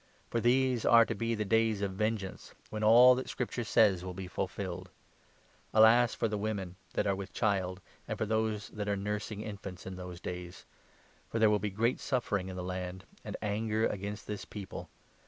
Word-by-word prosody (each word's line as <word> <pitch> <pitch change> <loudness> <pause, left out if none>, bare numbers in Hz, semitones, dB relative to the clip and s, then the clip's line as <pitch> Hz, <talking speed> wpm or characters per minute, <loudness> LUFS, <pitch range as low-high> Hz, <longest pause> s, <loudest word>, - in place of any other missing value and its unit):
For 120 - +1
these 125 0 +2
are 115 -1 +7
to - - -2
be 115 0 -1
the 105 0 -2
Days 110 -1 +2
of 100 - 0
Vengeance, 105 -1 -3
22 - - -34
when 110 0 -3
all 120 +4 +8
that 130 +1 -3
Scripture 120 -1 -3
says 105 -4 +4
will 90 -1 -6
be 95 0 -5
fulfilled. 95 -1 -4 0.9
Alas 115 +2 +6
for - - 0
the 105 -1 -2
23 100 - -5
women 95 -4 -4 0.2
that - - 0
are 100 -1 +2
with 100 +1 -6
child, 95 -4 0 0.3
and - - -3
for - - 0
those 110 -1 -1
that 105 -1 -4
are 100 - +1
nursing 105 +1 -3
infants 100 -4 -7
in 95 0 -6
those 90 -1 -7
days! 90 -1 -7 0.6
For - - -2
there 110 -1 +5
will 105 - +3
be 105 +1 -2
great 115 +5 0
suffering 105 -8 -1
in 95 - -6
the 90 - -4
land, 90 0 -4 0.2
and - - -5
anger 110 +1 0
against 100 +1 -3
this 105 -1 -5
people. 100 -3 -8
105 Hz, 200 wpm, -31 LUFS, 95-110 Hz, 0.9 s, all